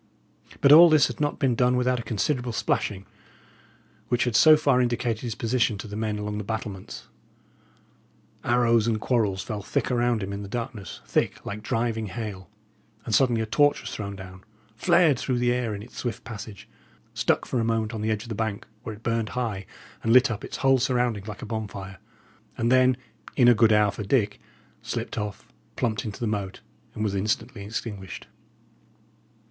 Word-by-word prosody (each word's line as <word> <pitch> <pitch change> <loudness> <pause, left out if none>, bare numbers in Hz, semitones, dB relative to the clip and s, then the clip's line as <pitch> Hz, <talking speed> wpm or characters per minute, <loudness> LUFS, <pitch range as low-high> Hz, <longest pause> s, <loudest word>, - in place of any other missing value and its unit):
But 140 - +6
all 170 +3 +10
this 155 -2 +6
had - - -7
not 145 0 0
been 130 -3 +2
done 125 +1 +2
without 125 0 +1
a - - -2
considerable 120 +2 -1
splashing, 100 -2 -1 1.0
which 120 - +1
had 120 -3 -1
so 155 +6 +8
far 140 -4 +3
indicated 120 -2 -1
his 120 -3 -4
position 115 -2 +1
to 105 - -7
the 105 - -7
men 110 -1 -2
along 105 0 -3
the - - -4
battlements. 100 - -6 1.4
Arrows 115 -2 +3
and 110 -2 +1
quarrels 105 -6 0
fell 105 -3 -4
thick 105 - -1
around 120 -3 +1
him 100 +1 -4
in 100 - -5
the 100 - -7
darkness, 115 -5 -5
thick - - -1
like 105 +1 -5
driving 115 0 -1
hail; 100 -4 -6 0.6
and 110 - -3
suddenly 120 -3 +3
a - - -1
torch 145 +7 +3
was - - -7
thrown 100 -2 -5
down 95 -1 -11 0.3
flared 170 0 +4
through 130 -2 -1
the 120 0 +2
air 120 -4 -1
in 100 - -7
its 120 - -14
swift 120 -2 -4
passage 105 -3 -9 0.5
stuck - - +1
for 125 - -1
a - - +1
moment 115 0 0
on 110 - -4
the 110 - -1
edge 110 -1 -1
of - - -11
the - - -2
bank, 110 -1 -3 0.2
where 110 - -6
it 110 - -18
burned 115 -2 0
high 110 -6 -3 0.3
and 115 - 0
lit 130 0 +6
up 110 0 -5
its - - -6
whole 135 -1 +4
surroundings 120 -5 0
like 105 +4 -7
a - - -4
bonfire 100 -4 -6 0.6
and 115 +1 +1
then, 130 -1 +5 0.4
in 125 -3 +5
a 120 - +8
good 110 0 +4
hour 105 -1 +4
for - - -7
Dick, 105 0 +1 0.4
slipped - - -4
off, 105 -1 -5 0.3
plumped 110 -2 -1
into 105 -3 -6
the 120 - -2
moat, 100 -3 -3 0.3
and 110 - -2
was 105 -2 0
instantly 105 +2 -2
extinguished. 100 -2 -6
115 Hz, 190 wpm, -26 LUFS, 105-125 Hz, 1.4 s, all